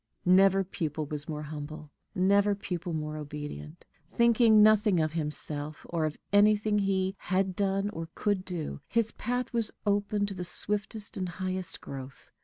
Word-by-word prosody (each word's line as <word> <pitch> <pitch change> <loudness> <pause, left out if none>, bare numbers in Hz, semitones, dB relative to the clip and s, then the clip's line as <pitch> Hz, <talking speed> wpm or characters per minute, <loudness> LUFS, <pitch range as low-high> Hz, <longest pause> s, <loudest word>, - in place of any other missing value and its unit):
Never 195 +1 +5
pupil 160 -4 -3
was 150 +2 -6
more 150 -1 -4
humble, 150 0 -7 0.2
never 200 +2 +3
pupil 180 -3 -4
more 155 -1 -3
obedient; 145 - -7 0.2
thinking 230 -2 +5
nothing 210 -3 +5
of 155 -1 0
himself 150 -1 -4
or 165 -2 -1
of 155 -1 -3 0.2
anything 210 +1 +4
he 190 -1 0
had 190 0 0
done 195 0 0
or 165 -4 -6
could 205 -3 0
do, 170 -6 -5
his 230 -1 +1
path 245 +1 -3
was 230 -2 0 0.2
open 205 0 +1
to 200 - -2
the 180 -1 -5
swiftest 205 +4 +1
and 185 -2 -2
highest 185 0 -4
growth. 135 0 -9
185 Hz, 155 wpm, -29 LUFS, 155-205 Hz, 0.2 s, Never